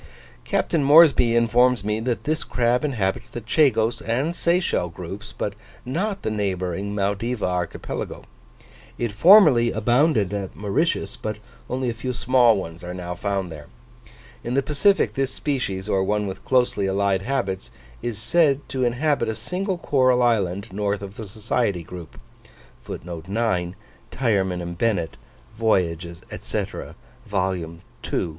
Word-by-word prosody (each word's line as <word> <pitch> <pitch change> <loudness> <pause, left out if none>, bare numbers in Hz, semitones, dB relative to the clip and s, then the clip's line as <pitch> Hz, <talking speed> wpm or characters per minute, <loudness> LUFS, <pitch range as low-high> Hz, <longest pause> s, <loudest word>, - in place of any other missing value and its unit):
Captain 160 -4 +1
Moresby 140 -5 +6
informs 120 0 +3
me 105 +1 -1
that 115 -2 -2
this 155 +4 -1
crab 120 +1 +1
inhabits 120 -3 -1
the 120 - -6
Chagos 115 -1 +2
and 130 +9 -1
Seychelle 170 - +1
groups, 95 +6 -8
but 100 - -2 0.3
not 195 +10 -2
the 110 - -1
neighbouring 100 -1 -2
Maldiva 105 +4 -1
archipelago. 90 -2 -4 0.7
It 120 -2 -2
formerly 130 - +7
abounded 120 - +2
at 100 -2 -4
Mauritius, 105 - -1
but 105 -1 -4 0.3
only 130 0 -1
a 120 - 0
few 125 +2 -4
small 120 -3 +4
ones 85 -3 -7
are 90 +1 -6
now 90 -1 -5
found 95 -1 -2
there. 75 -2 -10 0.8
In 120 +2 -2
the 140 - +2
Pacific, 155 +8 +2
this 135 -1 -1
species, 115 -10 -2
or 95 -2 +1
one 105 +2 0
with 95 -1 -6
closely 125 -6 +2
allied 95 0 +1
habits, 100 -6 -2 0.3
is 120 -3 -3
said 140 +5 +2
to 130 -1 -1
inhabit 125 0 +1
a 110 - -2
single 180 - -3
coral 130 -6 +3
island, 100 -3 +1
north 100 0 -1
of 100 0 -8
the 110 -2 -7
Society 105 -2 -1
group. 85 -2 -10
115 Hz, 125 wpm, -23 LUFS, 100-130 Hz, 0.8 s, formerly